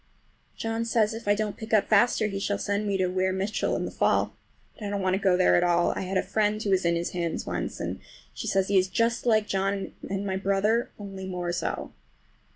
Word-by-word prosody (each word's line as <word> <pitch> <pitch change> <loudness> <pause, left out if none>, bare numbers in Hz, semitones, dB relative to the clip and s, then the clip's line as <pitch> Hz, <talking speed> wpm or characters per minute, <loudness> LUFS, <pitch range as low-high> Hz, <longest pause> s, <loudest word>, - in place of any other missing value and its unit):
John 225 0 -2
says 225 -2 +2
if 225 -1 -8
I 205 - +4
don't 210 -1 -2
pick 220 0 0
up 210 - +3
faster 215 +1 +4
he 200 -2 -2
shall 200 +1 -1
send 205 +1 -1
me 200 -1 +1
to 185 - +2
Weir 185 +1 0
Mitchell 195 +3 -1
in - - -2
the - - -5
fall. - - +1 0.4
But 215 - -9
I - - -2
don't 200 -1 -2
want 185 0 +2
to 190 - +1
go 185 -2 +3
there 185 - +4
at 175 - +4
all. 175 0 +3
I - - -3
had 190 0 -2
a - - +2
friend 215 0 +1
who 200 - 0
was 185 -2 +2
in 170 0 +3
his 170 +1 -2
hands 170 -2 -2
once, - - -3
and - - -4 0.3
she - - -6
says 195 -1 +2
he 200 -1 +4
is 185 - +1
just 230 +5 0
like 220 -2 +4
John 195 0 -1 0.2
and 195 +1 -2
my 190 -1 -1
brother, 200 +5 +1
only 195 -2 -7
more 180 -2 -3
so! 175 - -3
195 Hz, 245 wpm, -27 LUFS, 185-215 Hz, 0.4 s, I